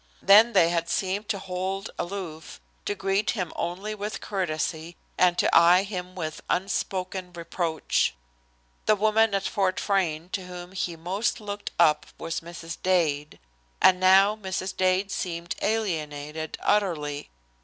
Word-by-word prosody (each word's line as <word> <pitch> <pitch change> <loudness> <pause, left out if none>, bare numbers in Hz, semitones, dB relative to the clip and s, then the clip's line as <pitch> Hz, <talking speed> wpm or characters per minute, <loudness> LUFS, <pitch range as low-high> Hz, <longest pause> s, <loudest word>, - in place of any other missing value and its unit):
Then 220 +4 +7
they 165 - +5
had 170 0 -1
seemed 195 +3 -1
to 200 - 0
hold 190 +2 -4
aloof, 175 -4 -6 0.3
to 205 - -1
greet 195 +2 0
him 180 -4 -3
only 190 +5 -3
with 210 0 -5
courtesy, 170 -3 -3 0.2
and 180 -1 +3
to - - +3
eye 175 +3 +7
him 185 -2 -6
with 155 -4 -5
unspoken 185 -1 -2
reproach. 170 -1 -1 0.7
The 215 - +6
woman 215 0 +3
at 195 - 0
Fort 190 -3 0
Frayne 175 -5 0
to 185 -1 -4
whom 180 0 -8
he 180 -3 -3
most 185 +10 -1
looked 205 -1 -5
up 155 -3 +4
was 165 0 -3
Mrs. 165 0 -8
Dade, 155 -5 +1 0.4
and 185 -1 +6
now 190 +3 +6
Mrs. 190 -2 -4
Dade 185 +1 +1
seemed 170 -2 -3
alienated 160 -7 -2
utterly. 155 -8 0
185 Hz, 140 wpm, -26 LUFS, 170-195 Hz, 0.7 s, Then